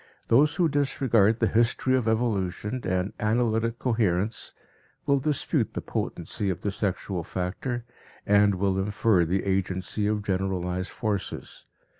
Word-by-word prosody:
Those 145 +5 +4
who 175 -1 +3
disregard 130 -7 +2
the 115 - +2
history 120 +3 +2
of 125 -3 0
evolution 110 0 -1
and 90 +2 -1
analytic 115 +1 +1
coherence, 110 -4 0 0.5
will 140 0 +3
dispute 145 +1 0
the - - -2
potency 100 - -3
of 90 - -3
the 100 - -1
sexual 95 -3 -2
factor 100 +8 -3 0.4
and 100 -1 +4
will 95 0 0
infer 100 -2 +2
the 90 +4 0
agency 95 +1 -1
of 105 -1 0
generalized 95 -1 -1
forces. 105 -4 -4
105 Hz, 130 wpm, -26 LUFS, 95-120 Hz, 0.5 s, Those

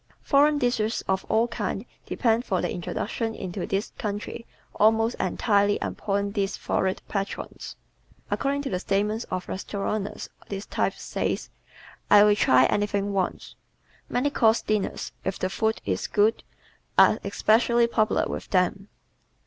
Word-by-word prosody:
Foreign 290 +2 +4
dishes 240 -4 0
of 190 0 0
all 225 +2 +3
kinds 215 -2 -3 0.2
depend 230 0 +1
for 190 -7 -1
their - - -1
introduction 225 +5 -3
into 185 0 -5
this 195 +2 -2
country 210 +2 -4 0.3
almost 225 +2 +3
entirely 205 +2 +2
upon 200 0 -2
these 200 -1 -1
florid 190 0 -1
patrons. 195 -1 -5 0.6
According 280 +1 0
to 270 - -4
the 180 - -1
statements 210 +4 0
of 185 0 -4
restauranteurs 200 +1 -4 0.2
this 200 0 -5
type - - 0
says, - - -3 0.6
"I 205 0 +8
will 210 0 +5
try 130 -10 +5
anything 205 +3 0
once." 190 -2 -2 0.6
Many 285 +4 0
course 225 -5 +3
dinners, 215 -2 -2
if 190 - -2
the 185 - -2
food 220 +2 0
is 95 -2 -1
good, 210 +2 +2 0.5
are - - +6
especially 235 +2 +3
popular 220 -2 +1
with - - -6
them. 190 +1 +1
205 Hz, 140 wpm, -26 LUFS, 195-225 Hz, 0.6 s, I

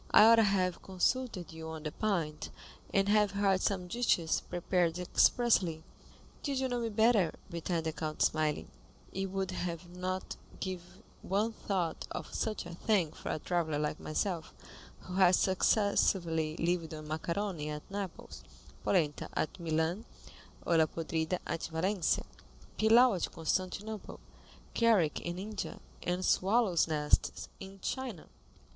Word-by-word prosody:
I - - +8
ought 230 +1 +8
to 225 - +6
have 185 -3 +1
consulted 190 -2 -1
you 160 0 -7
on 160 -1 -6
the 155 - -3
point, 170 -8 -2 0.4
and 195 0 +2
have 210 -1 +3
had 195 -2 +2
some 190 -3 0
dishes 175 -6 +1
prepared 175 -1 +1
expressly." 180 -2 +3 0.6
"Did 280 -2 -2
you 265 - +1
know 245 -1 -1
me 230 -1 -1
better," 220 -5 +3 0.2
returned 170 -1 -2
the 160 - 0
count, 155 -1 -2
smiling, 155 - 0 0.4
"you 195 0 -2
would 190 0 -2 0.4
not 185 +1 -4 0.2
give 185 -2 -3 0.4
one 205 +4 0
thought 185 -6 -2
of - - -6
such 215 -4 -2
a 175 - -7
thing 180 -3 +1
for - - -7
a - - 0
traveller 160 -2 -1
like 150 +1 -2
myself, 165 +1 -2 0.5
who 180 - -9
has 185 -1 +6
successively 180 -5 +2
lived 165 -2 -1
on 155 0 -8
macaroni 165 +1 -2
at 150 0 -5
Naples, 200 -3 -6 0.4
polenta 155 -6 +1
at 160 - -2
Milan, 165 +5 -1 0.6
olla 165 -2 +4
podrida 160 +2 -2
at 165 - -3
Valencia, 170 +3 0 0.5
pilau 230 +3 +6
at 180 - -2
Constantinople, 185 +5 -3 0.5
curry 215 -10 +4
in 175 0 -4
India, 205 +2 -5 0.2
and 180 +1 -1
swallows' 195 -3 +3
nests 150 -2 0
in 195 0 -10
China. 250 -10 -4
180 Hz, 140 wpm, -32 LUFS, 160-205 Hz, 0.6 s, I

